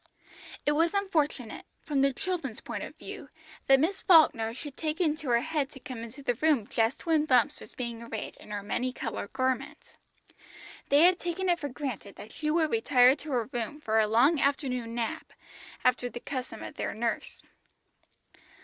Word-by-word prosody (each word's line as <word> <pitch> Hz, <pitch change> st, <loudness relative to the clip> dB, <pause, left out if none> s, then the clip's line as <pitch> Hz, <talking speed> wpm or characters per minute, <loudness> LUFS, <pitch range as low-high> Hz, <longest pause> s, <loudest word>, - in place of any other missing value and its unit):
It 295 Hz, -, +3 dB
was 330 Hz, +5 st, +2 dB
unfortunate, 305 Hz, -, -1 dB, 0.2 s
from 285 Hz, -3 st, 0 dB
the 275 Hz, 0 st, +4 dB
children's 335 Hz, -, -3 dB
point -, -, -6 dB
of -, -, -8 dB
view, -, -, -9 dB, 0.4 s
that 270 Hz, 0 st, +7 dB
Miss 365 Hz, +7 st, 0 dB
Falkner 300 Hz, -10 st, +5 dB
should 275 Hz, +4 st, -8 dB
take 310 Hz, +1 st, -3 dB
it -, -, +3 dB
into 310 Hz, -3 st, -1 dB
her 235 Hz, -1 st, +4 dB
head 300 Hz, -2 st, -1 dB
to 265 Hz, -, -13 dB
come 250 Hz, -2 st, -7 dB
into 245 Hz, +5 st, -10 dB
the 245 Hz, -, +1 dB
room 285 Hz, -3 st, +2 dB
just 225 Hz, +3 st, 0 dB
when 315 Hz, -2 st, +3 dB
Bumps 275 Hz, +1 st, +3 dB
was -, -, -12 dB
being 235 Hz, -3 st, -4 dB
arrayed 230 Hz, -2 st, -6 dB
in -, -, -15 dB
her 205 Hz, -1 st, -4 dB
many 250 Hz, +5 st, -2 dB
coloured 225 Hz, -5 st, -5 dB
garment. 265 Hz, +3 st, -2 dB, 0.9 s
They 290 Hz, +3 st, +6 dB
had 360 Hz, 0 st, +5 dB
taken 350 Hz, +2 st, -2 dB
it 345 Hz, -1 st, +2 dB
for 290 Hz, -, -4 dB
granted 250 Hz, -7 st, -5 dB
that 215 Hz, -, -11 dB
she 305 Hz, -, -3 dB
would 315 Hz, 0 st, +2 dB
retire 265 Hz, -, +5 dB
to 295 Hz, +1 st, -8 dB
her 240 Hz, -3 st, 0 dB
room 245 Hz, +5 st, -3 dB
for 220 Hz, -6 st, +1 dB
a 215 Hz, -, +3 dB
long 260 Hz, +9 st, +4 dB
afternoon 250 Hz, -4 st, 0 dB
nap, 230 Hz, -2 st, -3 dB, 0.5 s
after 250 Hz, -1 st, +2 dB
the 240 Hz, -, -7 dB
custom 255 Hz, 0 st, -5 dB
of -, -, -9 dB
their -, -, -3 dB
nurse. 230 Hz, +1 st, -3 dB
270 Hz, 185 wpm, -29 LUFS, 235-310 Hz, 0.9 s, that